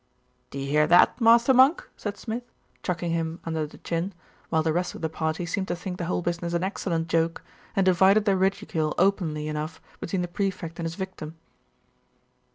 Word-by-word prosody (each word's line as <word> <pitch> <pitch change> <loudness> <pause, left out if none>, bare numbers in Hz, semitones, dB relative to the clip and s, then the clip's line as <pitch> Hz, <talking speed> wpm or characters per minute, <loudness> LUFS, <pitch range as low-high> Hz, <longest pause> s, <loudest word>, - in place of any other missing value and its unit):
'Do - - -8
you 135 0 -3
hear 150 +2 +3
that, 175 +8 +5
master 235 +3 +6
monk?' 265 +6 +5
said 205 -1 -4
Smid, 230 +1 -4 0.4
chucking 175 -2 -2
him 165 0 -2
under 160 -2 -2
the - - -14
chin, 170 +3 -3 0.3
while 160 -1 +2
the 160 -1 +1
rest 180 +2 -1
of - - -9
the 160 - -1
party 160 +2 -2
seemed 190 +3 -2
to 175 - -1
think 180 +1 -6
the 175 - -2
whole 175 +1 -1
business 170 0 -2
an 170 - 0
excellent 175 -4 -2
joke, 165 0 0 0.3
and 195 - +3
divided 190 +3 +5
their 200 -2 +3
ridicule 185 -5 0
openly 170 -6 +1
enough 155 +2 -4 0.2
between 180 +1 -2
the - - -2
Prefect 175 -2 -3
and 165 - -1
his 165 - -5
victim. 185 -5 -6
175 Hz, 190 wpm, -26 LUFS, 160-190 Hz, 0.4 s, master